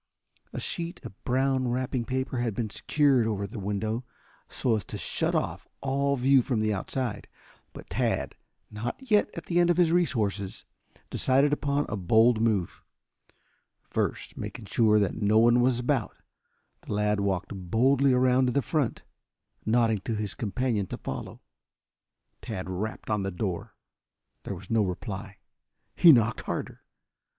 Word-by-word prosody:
A - - -5
sheet 170 -3 -4
of 105 -4 -11
brown 130 0 +1
wrapping 125 0 -1
paper 130 +1 -2
had 115 -4 -1
been 110 -2 -2
secured 140 -4 +2
over 100 -2 -1
the 100 +3 -7
window 110 +4 -2 0.5
so 120 -4 0
as 105 - -2
to - - -6
shut - - -1
off - - -2
all 140 +1 0
view 135 +1 +4
from 120 -2 -1
the 110 0 +1
outside. 105 +2 -3 0.4
But - - -11
Tad, - - 0 0.4
not 120 - -6
yet 210 0 +4
at - - -6
the 175 0 +1
end 175 0 +4
of 175 - +3
his 175 -2 +4
resources, 110 - 0 0.5
decided 135 +3 +3
upon 145 0 0
a 105 - -3
bold 110 +4 +4
move. 105 -7 0 1.0
First - - -3
making 115 - -6
sure 110 -1 +3
that 105 +1 0
no 105 +1 +3
one 120 +2 +5
was 125 -1 +3
about, 125 -2 -1 0.6
the - - -6
lad 105 0 +1
walked 100 -1 -1
boldly 125 +9 +2
around 130 0 +3
to 125 - 0
the 140 - +1
front, 150 -7 -1 0.6
nodding 115 -1 +3
to 110 +3 -3
his 105 -2 -3
companion 110 -2 -1
to - - -5
follow. - - -6 1.0
Tad 100 -6 -5
rapped 105 +4 -4
on 105 -1 +1
the 95 - -2
door. 90 -1 -4 0.7
There - - -4
was - - -11
no 115 -2 +3
reply. 100 +2 -5 0.6
He 170 - +8
knocked 115 -4 +3
harder. - - -5
115 Hz, 155 wpm, -27 LUFS, 105-130 Hz, 1.0 s, He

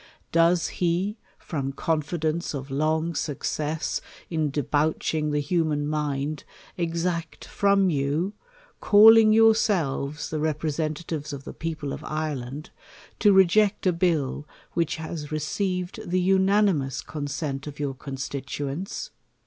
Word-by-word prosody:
Does 170 +1 +3
he, 185 +5 0 0.2
from 135 -4 -4
confidence 160 +2 -1
of 135 0 -6
long 155 +4 0
success 150 +1 -2 0.3
ia 160 -2 +1
debauching 150 +2 0
the 150 0 +1
human 150 -1 0
mind, 150 -1 -2 0.3
exact 170 -1 -2
from 200 -2 +2
you, 150 +7 0 0.5
calling 220 +1 +8
yourselves 185 -11 +2
the 155 - -1
representatives 155 0 -2
of 140 -1 -7
the - - -8
people 155 -4 -4
of - - -7
Ireland, 150 -2 -4 0.5
to 205 - +5
reject 195 +2 +4
a 185 - +4
bill, 160 -5 0 0.3
which 170 -2 0
has 160 -2 -6
received 180 +5 -2
the 185 +1 +2
unanimous 190 -6 +2
con 150 -2 -5
sent 145 -1 -4
of 145 0 -8
your 140 -2 -1
constituents 140 +4 -5
155 Hz, 115 wpm, -25 LUFS, 145-180 Hz, 0.5 s, calling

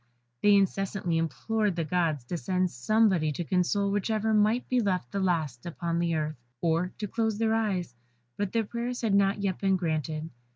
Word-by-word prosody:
They 205 0 +6
incessantly 195 -3 +1
implored 210 +5 -1
the 170 - -1
gods 160 -4 0
to 170 +8 -4
send 185 0 0
somebody 185 - +2
to 175 - -3
console 190 +4 +1
whichever 215 +2 0
might 215 +3 +2
be 255 - +2
left 185 - -1
the 200 - -2
last 160 -10 0
upon 170 0 -2
earth, 155 -1 -1 0.2
or 165 +3 +1
to 210 - -3
close 220 0 -1
their 220 0 +1
eyes, 195 - -1 0.4
but 205 -2 -2
their 230 -1 +1
prayers 240 +3 -4
had 220 -4 +1
not 200 0 +2
yet 190 -2 -1
been 195 -1 +2
granted. 160 -2 -2
190 Hz, 175 wpm, -28 LUFS, 165-210 Hz, 0.4 s, They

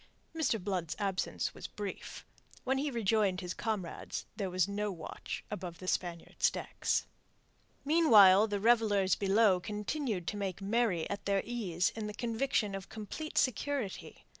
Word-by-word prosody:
Mr. 280 -8 +1
Blood's 180 -4 -2
absence 195 -2 -1
was - - -7
brief. 205 -2 -7 0.4
When 265 +1 +1
he 295 +2 0
rejoined 215 -5 +1
his 180 0 -4
comrades 210 -6 -4
there 195 -4 -2
was 185 0 +1
no 205 +1 -2
watch 165 -4 -6
above 180 -4 -5
the 185 - -9
Spaniards' 175 -2 0
decks. - - -1 0.8
Meanwhile 220 - +7
the 205 -1 -2
revellers 210 -4 +3
below 200 -1 +4
continued 210 - -3
to 210 - -4
make 195 -3 -3
merry 200 -4 +1
at 200 - -5
their 200 -1 +1
ease 195 -8 0
in 220 -1 -4
the 210 - -6
conviction 230 -2 0
of 195 0 -6
complete 220 +9 -6
security. 260 -3 -1
205 Hz, 145 wpm, -32 LUFS, 190-230 Hz, 0.8 s, Meanwhile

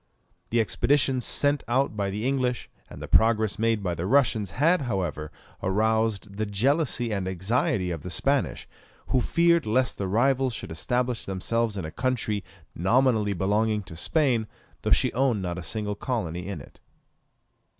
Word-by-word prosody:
The 120 - +1
expeditions 130 +3 +2
sent 145 0 +1
out 130 0 +1
by 100 -1 -1
the 105 +4 -3
English, 130 -2 -1 0.2
and - - -10
the - - -6
progress 110 -2 +3
made 115 -2 +1
by 90 -2 -1
the 85 +2 -3
Russians, 115 -6 +2
had, 155 - +2
however, 90 - -3 0.3
aroused 105 0 0
the 110 0 -1
jealousy 120 +3 0
and 100 -3 -2
anxiety 95 - 0
of 85 -3 -4
the 90 - -7
Spanish, 135 - 0 0.4
who 130 - +2
feared 170 +2 +2
lest 125 +3 +1
their 100 - -1
rivals 130 +4 +2
should 80 - -7
establish 125 +8 -1
themselves 105 +3 -1
in 95 - -3
a 80 - -6
country 115 -5 -1 0.3
nominally 110 +2 +2
belonging 105 +3 0
to 85 -3 -10
Spain, 120 - +1 0.3
though - - -2
she - - +3
owned 125 -5 +1
not 90 0 -3
a - - -5
single 105 +4 -3
colony 95 -6 -3
in 100 -7 -5
it. - - -16
110 Hz, 160 wpm, -26 LUFS, 95-130 Hz, 0.4 s, progress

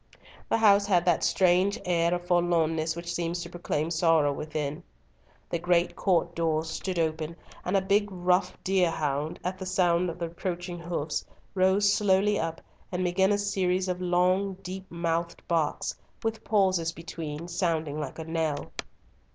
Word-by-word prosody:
The - - +3
house 200 -2 +5
had 175 -4 +3
that 175 -3 +2
strange 190 +4 +3
air 170 -1 +2
of 175 0 -6
forlornness 165 -2 +1
which 170 0 -5
seems 170 0 -2
to - - -9
proclaim 165 -2 -2
sorrow 160 -3 +3
within. 150 +1 -4 0.7
The 170 - 0
great 175 0 +2
court 175 -3 +1
doors 160 -1 0
stood 185 +2 -3
open, 160 0 -1 0.3
and 185 +2 +1
a - - +2
big, 205 +2 +2
rough 180 0 +1
deer 185 -2 +3
hound, 150 -1 -2
at 185 +1 -3
the 190 - -5
sound 180 -1 +2
of 165 - -6
the 170 - -2
approaching 175 +1 -4
hoofs, 165 -3 -3 0.3
rose 195 +2 +4
slowly 205 0 +3
up, 165 0 -3 0.3
and 180 0 -1
began 190 +2 +2
a 205 - +3
series 190 -2 0
of 180 0 -2
long, 185 +2 +2
deep 190 +1 -7
mouthed 170 0 -2
barks, 165 -3 0 0.3
with 225 0 -2
pauses 190 -6 +2
between, 165 -1 -6
sounding 165 -4 -1
like 150 - -5
a 160 - -5
knell. 160 -3 -2
175 Hz, 160 wpm, -28 LUFS, 165-185 Hz, 0.7 s, house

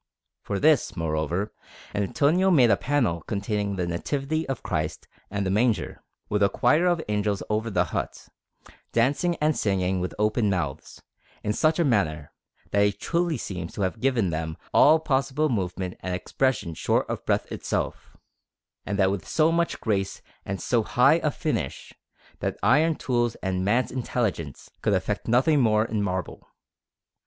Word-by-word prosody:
For 100 - -3
this, 150 -9 +3
moreover, 80 +5 -1 0.4
Antonio 150 - +2
made 130 -10 +5
a - - +6
panel 115 - 0
containing 100 -1 -2
the 90 -2 -1
Nativity 140 - -2
of 130 -3 -3
Christ 80 -3 -3 0.2
and 100 0 -2
the 95 - 0
Manger, 110 +2 0 0.3
with 105 0 -1
a 100 - +5
choir 150 - +3
of 175 -2 +1
angels 105 -1 -1
over 110 +2 0
the 90 -4 +2
hut, - - -4 0.6
dancing 140 +9 +2
and 155 -1 +1
singing 95 -2 0
with 90 0 -3
open 105 +1 +1
mouths, 85 -8 -3 0.4
in 105 - 0
such 155 +7 +2
a 170 - +2
manner, 80 - 0 0.4
that 100 0 +3
he 100 - +3
truly 170 - -1
seems 90 -3 -6
to 100 - -2
have 95 +4 -2
given 125 -9 +1
them 80 0 -3 0.2
all 155 +2 +7
possible 140 +1 0
movement 95 -5 -2
and 90 -1 -3
expression 110 -2 -1
short - - 0
of - - -4
breath - - 0
itself, - - -4 0.7
and 100 +1 -1
that 95 -1 +3
with 100 -2 -4
so 160 0 +3
much 170 0 0
grace 100 -3 -2 0.2
and - - -4
so - - +1
high - - +4
a - - +1
finish, - - -3 0.5
that - - -2
iron 155 +5 +4
tools 120 -4 0
and 95 -1 -1
man's 115 +4 +1
intelligence 110 - -3
could - - +1
effect - - -2
nothing 130 +6 +4
more 110 -2 +3
in 110 -2 -2
marble. 95 -3 -3
105 Hz, 160 wpm, -25 LUFS, 95-135 Hz, 0.7 s, all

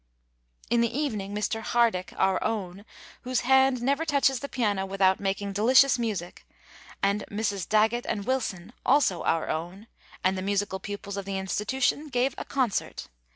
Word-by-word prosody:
"In 235 -1 +4
the 235 -1 +1
evening 210 -9 -2
Mr. 215 +2 -1
Hardick, 225 -6 +1
'our 190 -1 +2
own,' 200 -3 -3 0.4
whose 255 0 -1
hand 265 -1 +3
never 280 +5 +1
touches 280 -4 +2
the 280 - -6
piano 205 -6 0
without 190 -1 +2
making 200 0 -2
delicious 250 +5 +5
music, 205 -7 -4 0.6
and 200 +1 +1
Misses 205 -3 -2
Daggett 220 +3 +2
and 205 -2 -2
Wilson, 225 -6 -2
also 260 -10 +3
'our 165 -1 0
own,' 175 +6 -4 0.4
and 185 +1 +2
the 185 - -3
musical 200 0 -1
pupils 200 0 -6
of 200 - -4
the 195 0 -3
Institution, 250 +10 -1
gave 260 -1 0
a - - -5
concert. 255 -8 -2
210 Hz, 155 wpm, -27 LUFS, 195-250 Hz, 0.6 s, delicious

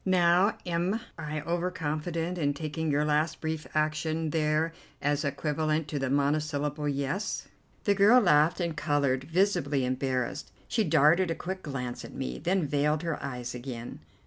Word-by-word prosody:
Now 180 +1 +4
am 175 +5 0 0.2
I 155 -1 -4
over 170 +3 -1
confident 165 +1 -3
in 145 -2 +1
taking 160 +1 -3
your 145 +1 +2
last 150 +1 +1
brief 160 -1 -3
action 155 +1 0
there 155 +1 +1 0.3
as 145 +1 0
equivalent 155 +2 -1
to 145 - -2
the 135 -1 -1
monosyllable 145 +1 0
'Yes'?" 140 +9 -2 0.4
The 205 - +3
girl 205 +5 +6
laughed 155 -5 +4
and 170 -3 -1
coloured, 140 -3 +1
visibly 155 -6 +1
embarrassed. 130 +1 -2 0.2
She 225 - +1
darted 165 +2 +4
a 165 - 0
quick 185 +3 -5
glance 125 -5 -5
at - - -10
me, 65 0 -4
then 180 -1 +1
veiled 150 +2 +1
her 165 -3 -2
eyes 125 -3 -5
again. 120 -1 -7
155 Hz, 155 wpm, -29 LUFS, 145-170 Hz, 0.4 s, girl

